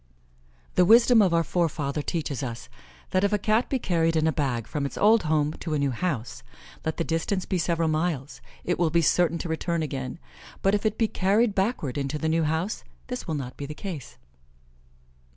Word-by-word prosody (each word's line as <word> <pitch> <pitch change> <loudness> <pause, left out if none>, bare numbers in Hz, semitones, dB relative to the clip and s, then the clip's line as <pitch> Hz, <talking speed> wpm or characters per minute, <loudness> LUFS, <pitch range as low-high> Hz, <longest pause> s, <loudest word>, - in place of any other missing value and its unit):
The 180 - +4
wisdom 230 +4 +6
of 190 -4 +3
our 165 0 +3
forefathers 150 -4 -1
teaches 150 -7 -2
us, 120 -3 -6 0.4
that 185 - +2
if 200 - +2
a 210 - +3
Cat 215 +4 +1
be 270 - +1
carried 165 -7 +1
in 160 0 +2
a 160 - +3
bag 130 -7 -1
from 150 - -3
its 140 - -4
old 220 +2 +5
home 155 -1 +1
to 160 -3 -2
a - - +1
new 140 -1 +1
house, 125 -5 -3 0.4
let 160 - -2
the - - 0
distance 165 +4 -1
be 185 - -1
several 165 0 +1
miles, 155 -3 -2 0.2
it 175 - -1
will 170 -2 +3
be 170 +1 +2
certain 170 +2 +3
to 170 - -5
return 165 0 -1
again; 135 -2 -4 0.5
but 195 - +3
if 210 +1 +2
it 215 - -2
be 225 - +2
carried 210 +3 +2
backward 190 - -1
into 140 +2 -2
the 160 +1 -1
new 165 +1 +2
house 160 +7 -1 0.3
this 250 -4 -5
will 160 - -1
not 130 -3 -5
be 140 - -5
the 150 - -7
case. 165 - -7
165 Hz, 205 wpm, -26 LUFS, 145-190 Hz, 0.5 s, wisdom